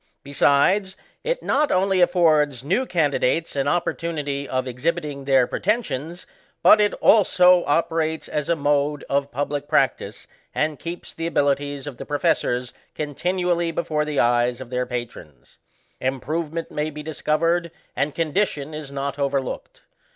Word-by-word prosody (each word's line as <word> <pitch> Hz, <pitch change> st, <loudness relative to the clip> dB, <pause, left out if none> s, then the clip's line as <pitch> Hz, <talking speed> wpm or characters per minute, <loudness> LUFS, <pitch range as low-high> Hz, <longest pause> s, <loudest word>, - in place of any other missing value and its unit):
Besides, 145 Hz, +8 st, +2 dB, 0.3 s
it -, -, -2 dB
not 295 Hz, +2 st, +1 dB
only 190 Hz, 0 st, +2 dB
affords 155 Hz, -7 st, +3 dB
new 195 Hz, -, 0 dB
candidates 160 Hz, -, 0 dB
an 135 Hz, 0 st, 0 dB
opportunity 150 Hz, -4 st, -2 dB
of 130 Hz, 0 st, -1 dB
exhibiting 140 Hz, +2 st, -3 dB
their 135 Hz, -3 st, +4 dB
pretensions^ 175 Hz, -, -2 dB, 0.4 s
but 210 Hz, -, +7 dB
it 205 Hz, -, +2 dB
also 180 Hz, -4 st, +5 dB
operates 160 Hz, +1 st, 0 dB
as 150 Hz, +1 st, -3 dB
a 170 Hz, -, +3 dB
mode 145 Hz, -1 st, 0 dB
of 140 Hz, 0 st, 0 dB
public 145 Hz, +2 st, -3 dB
practice, -, -, 0 dB, 0.3 s
and 150 Hz, -2 st, 0 dB
keeps 170 Hz, +1 st, -7 dB
the 165 Hz, 0 st, -3 dB
abilities 145 Hz, -2 st, 0 dB
of 145 Hz, -4 st, -7 dB
the -, -, -7 dB
professors 125 Hz, -4 st, 0 dB, 0.2 s
continually 175 Hz, +3 st, -1 dB
before 155 Hz, -2 st, -1 dB
the 150 Hz, -2 st, -2 dB
eyes 120 Hz, 0 st, +2 dB
of 130 Hz, -2 st, -9 dB
their 125 Hz, 0 st, -1 dB
pa 120 Hz, -1 st, -2 dB
irons. 75 Hz, -, -16 dB, 0.4 s
Improvement 155 Hz, +5 st, -3 dB
may 150 Hz, +1 st, -2 dB
be 150 Hz, 0 st, -8 dB
discovered, 165 Hz, +3 st, 0 dB, 0.3 s
and 140 Hz, +3 st, -1 dB
condi 165 Hz, +5 st, +1 dB
tion 145 Hz, +1 st, -7 dB
is 150 Hz, -2 st, -7 dB
not 140 Hz, 0 st, -4 dB
overlooked. 140 Hz, -2 st, -3 dB
150 Hz, 145 wpm, -23 LUFS, 140-170 Hz, 0.4 s, but